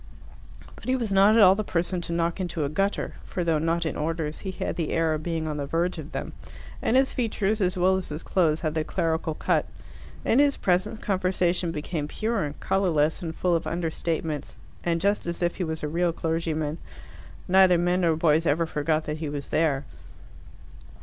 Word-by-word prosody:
But - - -14
he 255 - +2
was 230 -6 -1
not 200 +3 +6
at 220 - +8
all 185 -1 +8
the 215 +2 -2
person 180 -1 -1
to 170 - -5
knock 170 +1 0
into 175 -4 -2
a - - -1
gutter, 195 +6 -1
for 180 - -3
though 165 -2 +2
not 165 +2 0
in 160 - -2
orders, 155 0 -2
he 195 - -5
had 190 - -3
the 165 -3 -2
air 165 -1 +2
of 155 - -2
being 160 -1 -2
on 150 -1 -3
the 140 -1 -3
verge 170 +4 0
of - - -8
them, - - -5 0.5
and 250 - +2
his 265 0 +3
features, 215 -3 -1
as 185 0 +1
well 185 +1 +3
as 190 - -4
his 150 +2 -5
clothes, 160 -4 +1
had 155 -3 -1
the 155 -1 0
clerical 160 0 -1
cut. - - +1 0.6
In 240 - +4
his 285 -1 +4
presence 190 +4 +1
conversation 185 -4 0
became 150 -1 -3
pure 220 +4 -1
and 145 0 -7
colourless 165 -4 +1
and 165 -2 -5
full 180 -2 +1
of 165 - -1
understatements, 165 -2 -3 0.3
and 170 -1 +1
just 200 +1 0
as 170 +1 -3
if 175 - 0
he 185 - -1
was 160 -2 -4
a - - 0
real 170 +3 +1
clergyman 160 -2 -2 0.7
neither 185 -1 +6
men 175 +2 +1
nor 165 -2 +3
boys 160 0 +2
ever 165 +3 +2
forgot 155 0 0
that 150 0 -3
he 155 -2 -4
was 145 -1 -5
there. 145 -4 +1
170 Hz, 205 wpm, -26 LUFS, 155-185 Hz, 0.7 s, at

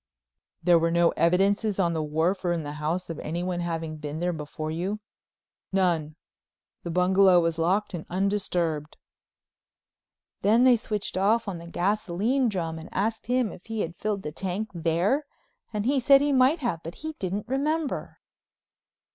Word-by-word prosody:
"There 175 -1 +5
were 165 +1 +2
no 170 0 +4
evidences 195 +5 +2
on 175 -3 +2
the 160 - -1
wharf 160 +6 0
or 175 - +1
in 165 -2 -2
the 145 - -5
house 170 +3 -2
of 160 - -6
anyone 175 +3 -3
having 165 -2 -3
been 150 +1 -5
there 175 +1 0
before 155 0 -5
you?" 185 +6 -2 0.7
"None. 170 -5 +1 0.7
The 170 - -6
bungalow 180 +1 +5
was 165 -1 0
locked 190 +6 +1
and 170 -3 -6
undisturbed." 175 -5 -1 1.4
Then 225 +4 +4
they 255 -1 +7
switched 210 -4 -3
off 215 +4 +2
on 185 -4 -4
to 170 - -10
the - - -11
gasoline 210 +7 +1
drum 165 -5 -3
and 160 - -10
asked 220 +3 -2
him 250 -3 +1
if 180 - -13
he 225 -1 -2
had 170 +1 -4
filled 205 0 -2
the 150 - -4
tank 195 +6 -3
there 175 - +1 0.4
and 210 -1 -2
he 270 +2 +2
said 275 +2 +6
he 285 0 +1
might 265 +5 +4
have 200 -11 -1
but 165 +2 -8
he 315 - -3
didn't 195 +3 -3
remember. 295 +4 -1
185 Hz, 170 wpm, -26 LUFS, 165-215 Hz, 1.4 s, they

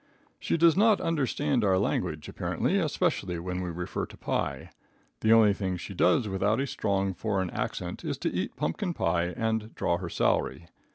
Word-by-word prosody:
She - - 0
does 165 -1 +5
not 210 +1 +5
understand 145 -4 0
our 95 -2 +3
language, 85 -5 -1
apparently, - - -1
especially 90 -1 0
when 90 +2 -3
we 90 - -3
refer 85 +1 -4
to - - -14
pie. - - -3 0.5
The 110 - +2
only 110 -3 +6
thing 95 -2 -2
she 95 - -7
does 95 +5 +3
without 100 +3 +1
a 135 - +1
strong 100 -6 -1
foreign 95 -2 -1
accent - - -4
is - - -2
to - - -2
eat - - -2
pumpkin 160 - -2
pie 85 0 +1
and 110 +4 -2
draw 85 - +1
her 90 -2 -5
salary. 85 - 0
100 Hz, 175 wpm, -28 LUFS, 90-115 Hz, 0.5 s, only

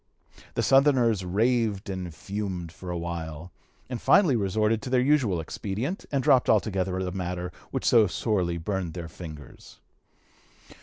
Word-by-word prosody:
The - - 0
Southerners 130 -7 +4
raved 110 +2 +1
and 95 -3 -4
fumed 95 0 -5
for 90 +2 -10
a 90 - -2
while, 85 -1 -5 0.4
and 125 -3 -5
finally 165 -10 +5
resorted 105 +1 +1
to 135 - -6
their 125 0 +3
usual 125 - +2
expedient, 105 - -4
and 135 -2 0
dropped 130 0 +4
altogether 95 -4 +1
a 95 -1 -2
matter 90 -1 -4 0.2
which - - -3
so 110 -3 +5
sorely 90 -3 -1
burned 90 -1 -3
their 85 -2 -5
fingers. 80 -3 -11
95 Hz, 145 wpm, -27 LUFS, 90-115 Hz, 0.4 s, finally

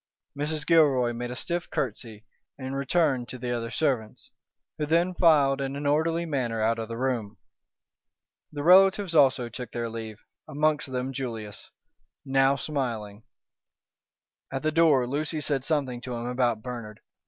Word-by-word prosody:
Mrs. 150 +1 -2
Gilroy 140 -8 +4
made 120 +1 -4
a 125 - -5
stiff 170 +6 -3
curtsey 110 -3 -4 0.3
and 135 0 -5
returned 140 -3 +1
to 130 - -6
the 125 0 -4
other 115 -1 -4
servants, 130 -9 -2 0.5
who 150 - -1
then 170 +4 +2
filed 145 -6 +4
in 135 0 -3
an 145 +1 -5
orderly 165 +4 +1
manner 125 -7 -2
out 115 +1 +1
of 110 - -4
the 115 0 -6
room. 115 -5 -2 1.1
The 145 -1 -5
relatives 190 +1 +5
also 135 -5 +4
took 125 +1 -8
their 120 -1 -3
leave, 110 -2 -7 0.3
amongst 150 -2 0
them 130 +1 -3
Julius, 115 -6 -6 0.6
now 135 0 +3
smiling. 115 -8 -4 1.3
At 135 +1 -4
the 155 - +1
door 155 -5 +4
Lucy 150 +5 -2
said 140 -3 -1
something 135 -5 -1
to 125 -1 -5
him 120 0 -5
about 120 -3 0
Bernard. 115 -4 -7
135 Hz, 155 wpm, -27 LUFS, 120-150 Hz, 1.3 s, relatives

